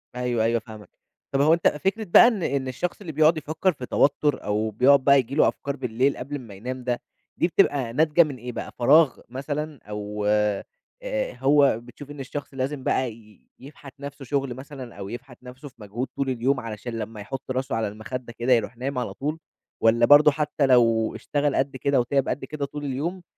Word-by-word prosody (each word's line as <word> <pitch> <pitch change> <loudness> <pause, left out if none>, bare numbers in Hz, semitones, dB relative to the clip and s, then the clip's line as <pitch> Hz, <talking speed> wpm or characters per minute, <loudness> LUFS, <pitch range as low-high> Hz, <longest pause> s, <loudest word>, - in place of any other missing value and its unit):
أيوه 125 -2 0
أيوه 115 +1 +2
فاهمك، 110 -2 -12 0.4
طَب 135 - +1
هو 155 +3 +5
أنت 170 - +3
فكرة 195 +9 0
بقى 190 +5 +7
إن 215 -8 0
إن 135 -1 -1
الشخص 175 +10 -3
اللي 170 - -6
بيقعد 155 +2 +4
يفكَّر 155 +5 0
في 130 -3 -7
توتُّر 145 +2 +1
أو 105 +1 -1
بيقعد 135 +6 +5
بقى 140 0 +6
ييجي 135 +1 +1
له - - +5
أفكار 140 -1 -3
بالليل 130 +1 0
قبل 140 +3 -5
امّا 120 -7 -8
ينام 125 +6 -6
ده، 125 -1 -2 0.4
دي - - +2
بتبقى 140 -10 +1
ناتجة 160 +3 +4
من 145 -4 -5
إيه 125 +1 -7
بقى؟ - - -6
فراغ 145 +2 +5
مثلًا 145 +3 -4
أو 105 0 -4
آآ، 105 -1 +1 0.8
هو 140 -4 +4
بتشوف 130 +4 -12
إن 145 - -10
الشخص 140 +1 -6
لازم 135 +1 -3
بقى 130 -2 0
ي 110 -2 -20
يفْحَت 140 0 -13
نَفْسه 140 -1 -8
شُغل 135 -1 -1
مثلًا 130 -1 -10
أو 100 0 -7
يفْحَت 125 +1 -10
نَفْسه 125 +3 -10
في - - -30
مجهود 110 +6 -4
طول 135 -1 -1
اليوم 130 +2 0
علشان 115 +1 -6
لمّا 105 0 -6
يحُط 130 +5 -6
راسه 130 -1 -2
على 110 -2 0
المخدّة 120 +4 -7
كده 125 +2 +3
يروح 115 0 0
نايم 130 +2 -3
على 125 - -3
طول، 150 +3 -4 0.4
والّا 115 +1 +4
برضو 145 +3 +7
حتى 150 -1 0
لو 115 -3 +3
اشتغل 145 -1 -1
قدّ 135 0 -1
كده 140 0 +1
وتِعب 135 +3 +1
قدّ 135 - -3
كده 145 0 -4
طول 145 +1 -7
اليوم 165 +7 -3
130 Hz, 200 wpm, -24 LUFS, 120-145 Hz, 0.8 s, بقى